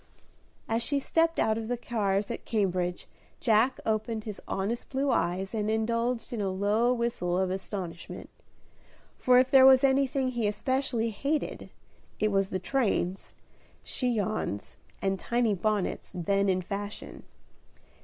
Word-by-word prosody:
As 225 +1 0
she 280 +4 +1
stepped 330 +4 +1
out 220 0 +2
of 220 - -5
the 245 +1 -1
cars 205 -4 -1
at 235 - -5
Cambridge, 185 -5 -1 0.3
Jack 230 +3 +3
opened 220 0 -1
his 210 -2 -7
honest 205 +5 -2
blue 275 +1 0
eyes 190 +1 0
and 215 -1 -1
indulged 230 +2 -1
in 225 - -2
a 195 - 0
low 205 +5 +2
whistle 235 -8 -1
of 185 -1 +1
astonishment: 185 -3 -4 0.9
for 250 -1 +4
if 255 +1 +4
there 265 -1 +8
was 265 0 +7
anything 270 -1 +2
he 240 -4 -1
especially 230 +1 0
hated, 285 +8 -2 0.5
it 215 0 +2
was 195 -1 +1
the 185 - -1
trains, 195 -3 -1 0.5
chignons 215 - -2 0.3
and 195 -1 0
tiny 235 -2 +1
bonnets 205 +1 -1
then 195 +3 +1
in 185 -1 +1
fashion. 200 +3 -6
220 Hz, 140 wpm, -28 LUFS, 195-245 Hz, 0.9 s, there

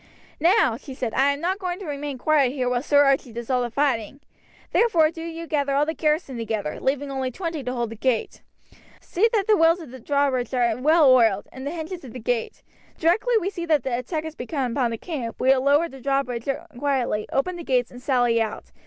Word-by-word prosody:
"Now," 335 - +3
she 265 0 -10
said, 240 -4 -3
"I 270 +3 +3
am 280 +1 -4
not 370 +3 -1
going 360 -2 -3
to 395 - -8
remain 290 -2 -4
quiet 280 -1 +2
here 255 -3 -1
while 245 -1 0
Sir 285 +1 +4
Archie 275 -3 +2
does 235 +2 -6
all 250 -1 +2
the 240 - -2
fighting, 260 -1 -1 0.5
therefore 335 -10 +3
do 325 - -9
you 330 0 -6
gather 285 -3 0
all 290 +1 +3
the 320 - -2
garrison 300 -5 -1
together, 220 -8 -3
leaving 275 +1 -1
only 265 -1 -2
twenty 330 +1 -4
to 250 - -3
hold 240 -3 -2
the - - -6
gate. 235 0 -1 0.6
See 435 +6 +1
that 415 -4 +1
the 430 - +4
wheels 330 0 +4
of 315 -8 -10
the 260 - -10
drawbridge 265 -2 0
are 240 -2 +2
well 305 +5 +4
oiled, 225 -5 +3
and 260 +1 -7
the - - -2
hinges 340 +1 -6
of 250 - -10
the 255 - -7
gate. 230 0 -2 0.3
Directly 430 +9 +2
we 390 0 -2
see 345 -3 -5
that 305 -5 +2
the 255 -2 -1
attack 305 +6 -3
has 315 -1 -6
begun 260 -2 -3
upon 245 -1 +1
the 230 - -4
camp 255 -6 -5
we 260 - +2
will 265 -1 +5
lower 290 +5 +3
the 270 -4 -12
drawbridge 270 -2 -1 0.3
quietly, 260 -7 0
open 350 +7 0
the 345 - -7
gates, 250 -5 0
and 245 - -11
sally 245 -3 +2
out. 220 -1 -4
275 Hz, 230 wpm, -24 LUFS, 245-320 Hz, 0.6 s, will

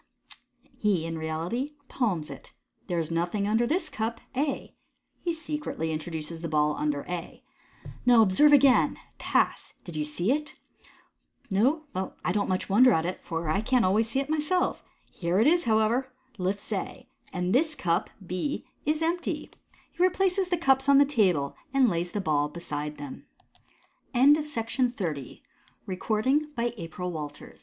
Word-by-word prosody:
He 195 -6 +1
in 165 -1 -4
reality 170 - -3
palms 185 - -1
it. - - -11 0.2
" - - -41
There 175 - -1
is 165 -1 -1
nothing 175 +5 0
under 225 +3 +2
this 350 +8 0
cup" 230 -5 -3 0.2
(A). 280 +2 -2 0.4
He 345 - -1
secretly 300 - -3
introduces 160 +1 -4
the 170 - -3
ball 150 -1 +2
under 145 -1 -1
A. 175 -1 -6 0.4
u - - -9
Now 240 -2 +7
observe 215 +10 +5
again. 275 -3 +5 0.2
Pass! - - 0
Did 175 -4 -9
you 155 - 0
see 175 +8 0
it? 300 +2 -2 1.0
No? 260 +11 +2
well, 190 +1 -3
I - - +2
don't 200 +1 0
much 185 0 -1
wonder 250 +6 +6
at 160 -4 +2
it, 180 +1 -4
for 165 0 -3
I 190 +6 +1
can't 245 0 +2
always 215 +4 +2
see 265 - 0
it 275 - -2
myself. 310 +4 0 0.3
Here 175 0 -1
it 220 - +4
is, 345 +2 +4
how 220 -2 +3
ever 240 +4 +1
" 255 -3 -31
(lifts 195 +4 -2
A), 255 +6 -5
" - - -28
and 180 +1 -1
this 310 +4 +2
cup 180 -7 0 0.2
(B) 185 +12 -3 0.2
is 310 +1 +1
empty." 345 +2 -2 0.4
He - - -6
replaces 370 0 +2
the 355 - +1
cups 270 -3 +3
on 280 - +7
the 285 - +7
table, 185 - +1 0.2
and 265 -2 +5
lays 175 -3 -1
the 205 - -2
ball 150 -4 +1
beside 150 -2 -5
them. 145 -2 -9 0.9
Pass 275 -2 +3 0.2
III. 150 -8 -4
215 Hz, 160 wpm, -27 LUFS, 170-275 Hz, 1.0 s, Now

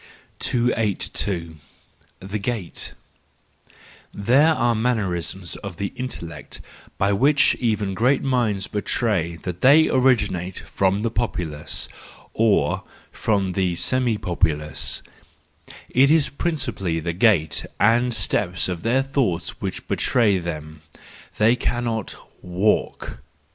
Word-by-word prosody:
282. 100 -8 0 0.6
The 95 +3 -4
Gait 100 -4 -3 1.2
—There 135 +10 +3
are 120 -1 +2
mannerisms 95 - -1
of 100 -5 -8
the 100 +2 -3
intellect 125 -10 -6 0.4
by 100 +1 +2
which 140 +7 +4
even 105 -5 0
great 125 +7 +2
minds 115 -7 +1
betray 100 -5 -1
that 90 -1 -5
they 150 +4 +6
originate 105 -9 +1
from 100 +2 0
the 115 - 0
populace, 85 -10 -3 0.5
or 110 -2 +2 0.3
from 100 -3 0
the 90 -2 0
semi 125 +3 0
populace:—it 80 -6 -1 1.0
is 155 -2 +4
principally 125 - -2
the 85 +1 -3
gait 90 -4 +2
and 120 +4 +3
step 95 -5 0
of 90 -2 -4
their 125 +4 +2
thoughts 130 - -1
which - - -5
betray 105 -6 +2
them; 80 -3 -6 0.6
they 110 +3 +4
cannot 120 -3 -2 0.3
walk. 90 - -1
105 Hz, 105 wpm, -22 LUFS, 90-120 Hz, 1.2 s, they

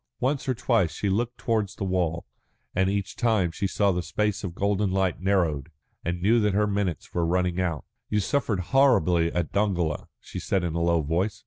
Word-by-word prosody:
Once 135 +1 0
or 130 - +1
twice 115 -8 +1
she 100 - -1
looked 120 +4 -1
towards 110 -4 -1
the - - -5
wall, 90 -3 -1 0.5
and 95 +1 +2
each 100 -1 -2
time 110 -8 +2
she 100 +4 -2
saw 100 +1 +2
the 90 -1 -1
space 105 +2 -1
of 90 -3 -5
golden 100 +1 +1
light 95 -1 0
narrowed, 85 -7 +1 0.3
and 85 +1 -3
knew 115 +4 +4
that 105 -3 +1
her 105 +1 +3
minutes 100 -5 -2
were 85 - 0
running 90 +1 +1
out. 85 -5 -2 0.2
"You 105 - +1
suffered 105 -2 0
horribly 90 - +4
at 85 -2 -2
Dongola," 90 -7 0
she - - -7
said 95 -2 0
in 85 -2 -2
a 85 - -1
low 85 -1 +2
voice. 95 +8 -1
95 Hz, 200 wpm, -26 LUFS, 85-105 Hz, 0.5 s, knew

